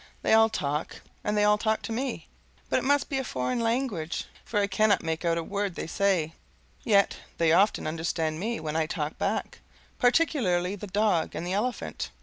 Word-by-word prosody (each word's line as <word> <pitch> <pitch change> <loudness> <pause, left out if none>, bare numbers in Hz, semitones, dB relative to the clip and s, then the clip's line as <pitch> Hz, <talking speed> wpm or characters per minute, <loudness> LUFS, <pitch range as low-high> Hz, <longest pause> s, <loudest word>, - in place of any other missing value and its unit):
They - - +3
all 225 0 +6
talk, 150 -7 -3 0.2
and 210 0 0
they 210 - +4
all 210 0 +4
talk 220 0 0
to - - -5
me, 250 +3 -3 0.4
but - - +3
it - - -5
must 285 +1 +2
be 270 - -1
a - - -2
foreign 125 - -2
language, 230 -8 -1 0.2
for 210 - -1
I 200 - +3
cannot 200 +1 +2
make 160 0 -2
out 170 -1 +1
a 165 - -1
word 200 0 -2
they - - -4
say; 175 -3 +1 0.5
yet 200 -4 +3 0.2
they 165 -1 +3
often 195 +6 +3
understand 160 0 -2
me 230 +5 -2
when 155 -1 -4
I 160 -1 +1
talk 155 0 -4
back, 200 +1 -2 0.4
particularly 240 - +2
the 205 +1 -8
dog 200 -4 +1
and 170 - -4
the 180 - -2
elephant. 205 - -2
200 Hz, 195 wpm, -27 LUFS, 165-220 Hz, 0.5 s, all